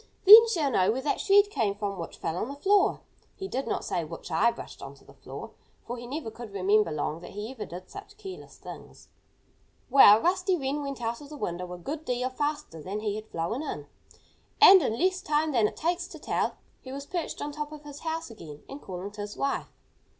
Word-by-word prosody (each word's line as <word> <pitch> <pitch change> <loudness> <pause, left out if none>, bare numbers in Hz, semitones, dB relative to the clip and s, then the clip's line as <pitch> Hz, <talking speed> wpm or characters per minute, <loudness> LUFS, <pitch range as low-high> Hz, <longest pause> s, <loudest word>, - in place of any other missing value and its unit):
"Then 440 +4 +11
she'll 320 -11 0
know 185 -4 +3
where 255 +4 -2
that 295 - 0
shred 405 +1 +5
came 205 - 0
from 200 -2 -4
which 165 - -7
fell 160 - -3
on 185 - -2
the 280 - -6
floor." 390 +7 +3 0.3
He 385 - -6
did 270 -6 -3
not - - -2
say 175 - -1
"which 165 +3 -9
I 200 +9 +4
brushed - - -9
onto - - -11
the - - -16
floor," - - -9 0.3
for 240 - -4
he 240 0 -8
never 275 -3 -5
could 225 -2 -10
remember 200 +2 +2
long 150 +1 -2
that 175 - -10
he 210 +4 -5
ever 265 - -7
did 180 +2 -9
such 400 - -11
careless 385 -3 -10
things. - - -12 0.8
Well, 215 -6 +9
Rusty 370 - +1
Wren 280 0 -2
went 275 -3 -5
out 230 +2 -2
of 285 - -11
the 300 - -9
window 180 -5 -4
a 180 - -6
good 295 - -5
deal 250 -1 -1
faster 290 - -3
than 200 +6 -4
he 210 -2 -1
had 215 +1 -6
flown 170 - -3
in. 310 - -5 0.7
And, 390 -3 +9
in 230 -6 -1
less 370 +3 +1
time 305 +1 +1
than 230 -6 +3
it - - -9
takes 350 +2 -1
to - - -10
tell - - 0
it, - - -14 0.3
he 260 - -10
was 280 +1 -6
perched 345 +1 -4
on 295 - -4
top 300 0 -5
of 300 -1 -10
his 290 -1 -10
house 325 -4 -4
again 150 -9 -11
and 280 +1 -9
calling 185 +2 -6
to 205 0 -8
his 205 0 -7
wife. 275 - -2
260 Hz, 230 wpm, -28 LUFS, 205-310 Hz, 0.8 s, Then